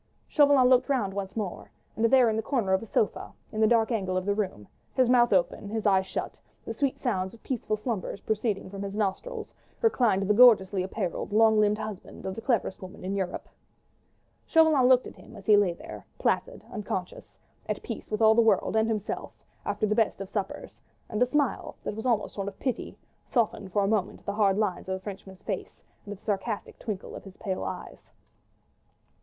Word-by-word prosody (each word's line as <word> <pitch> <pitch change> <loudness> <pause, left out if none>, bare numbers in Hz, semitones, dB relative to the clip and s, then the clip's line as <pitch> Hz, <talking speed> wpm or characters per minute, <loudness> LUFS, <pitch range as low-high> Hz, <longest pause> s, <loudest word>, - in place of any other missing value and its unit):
Chauvelin 285 -4 +5
looked 255 +1 +4
round 225 -9 0
once 195 -1 -5
more, 205 -5 -4 0.3
and 225 - -2
there 250 +1 +6
in 220 - +1
the 220 - 0
corner 220 -5 0
of 190 - +2
a 225 - -8
sofa, 210 - -1 0.2
in 220 - -2
the 220 - +6
dark 225 +1 +3
angle 190 -5 0
of 185 - -2
the 205 - +2
room, 190 - -3 0.3
his 255 -2 +4
mouth 240 -1 +5
open, 190 +1 +1
his 220 0 -3
eyes 190 -2 +3
shut, - - -4 0.3
the - - -4
sweet 275 -2 0
sounds 190 -5 -1
of 225 - -21
peaceful 225 -4 -2
slumbers 215 -3 -3
proceeding 215 -2 -1
from 195 +1 -7
his 200 0 -5
nostrils, 210 - -3 0.3
reclined 240 - +2
the 205 +2 +2
gorgeously 205 -5 +6
apparelled, 190 0 -3
long 220 0 +5
limbed 210 0 +3
husband 215 -3 -7
of 190 - -2
the 225 - -7
cleverest 230 -6 0
woman 185 -1 -9
in 190 - -2
Europe. 185 -2 -3 1.0
Chauvelin 315 -6 +5
looked 255 -1 +5
at - - -8
him - - -14
as 200 -2 -12
he 210 - +6
lay 205 -3 +4
there, - - -10
placid, - - -1
unconscious, 195 -4 -5 0.3
at - - -2
peace - - -6
with 215 +1 0
all 220 0 +7
the 235 - +5
world 225 -1 +2
and 220 0 +3
himself, 215 -2 -3 0.3
after - - 0
the 210 - +1
best 220 -2 +1
of 195 -1 -7
suppers, 200 -2 -4 0.3
and 215 - -3
a 250 - +5
smile, 285 0 0
that - - -4
was 220 +3 -3
almost 220 -3 0
one 195 - -2
of 200 - -6
pity, 255 -3 -3 0.3
softened 215 -5 0
for 200 +2 +2
a - - +1
moment 205 -2 -1
the 200 - -2
hard 200 -2 +3
lines 190 -3 -1
of 190 - 0
the - - -6
Frenchman's 190 -2 -9
face - - -5 0.2
and - - -6
the 205 - -6
sarcastic 210 +1 -3
twinkle 205 -4 -5
of - - -9
his 195 -1 -13
pale 190 -2 -3
eyes. - - -7
210 Hz, 205 wpm, -28 LUFS, 195-230 Hz, 1.0 s, all